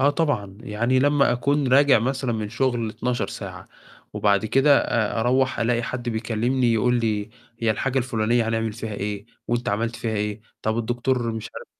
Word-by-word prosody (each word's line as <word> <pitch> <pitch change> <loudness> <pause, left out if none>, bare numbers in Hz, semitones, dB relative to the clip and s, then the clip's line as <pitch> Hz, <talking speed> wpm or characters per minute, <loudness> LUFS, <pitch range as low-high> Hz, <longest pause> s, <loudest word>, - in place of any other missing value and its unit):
آه 140 +2 +5
طبعًا، 140 - -1
يعني 120 +4 0
لما 145 -1 +3
أكون 140 +3 +1
راجع 140 0 +6
مثلًا 130 +1 -1
من 110 -2 -3
شغل 115 0 0
12 120 -2 -2
ساعة، - - -8 0.4
وبعد 100 -1 +2
كده 135 +4 +5
أ 110 -1 0
أروَّح 130 +3 +1
ألاقي 120 +1 +1
حد 120 +1 -4
بيكلمني 120 +2 0
يقول 125 +2 +2
لي 105 -2 -1 0.3
هي 115 -1 +1
الحاجة 135 +5 0
الفلانية 115 -2 +1
هنعمل 115 -1 -1
فيها 110 0 -6
إيه، 100 +1 -4 0.2
وأنت 120 +1 -1
عملت 115 +3 -1
فيها 115 -2 -3
إيه، 105 +1 -2 0.2
طب 110 +1 0
الدكتور 120 +1 -1
مش 110 -1 -6
عارف - - -8
120 Hz, 175 wpm, -23 LUFS, 110-130 Hz, 0.4 s, راجع